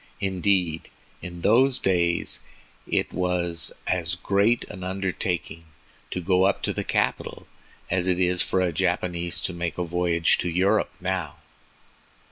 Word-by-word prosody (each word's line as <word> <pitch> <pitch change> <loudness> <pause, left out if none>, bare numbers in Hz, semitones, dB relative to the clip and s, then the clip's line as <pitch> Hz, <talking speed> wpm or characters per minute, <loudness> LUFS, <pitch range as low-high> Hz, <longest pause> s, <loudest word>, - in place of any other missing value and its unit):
Indeed, 95 -3 0 0.3
in 85 -1 -8
those 125 +7 +4
days 85 -2 +1 0.5
it - - 0
was 90 -2 -1
as 90 -2 0
great 100 +6 +2
an 90 - -9
undertaking 90 -3 -3 0.4
to - - -3
go 90 +1 +3
up 100 - +1
to - - 0
the - - -3
capital - - -1 0.5
as 90 0 +2
it 90 -1 +2
is 90 -1 +2
for 95 - +1
a 90 -2 +1
Japanese 85 +2 0
to 90 - -2
make 85 -3 -3
a 90 - 0
voyage 85 -1 +2
to 90 - -1
Europe 95 +4 +2
now. 90 -5 -2
90 Hz, 140 wpm, -25 LUFS, 85-95 Hz, 0.5 s, those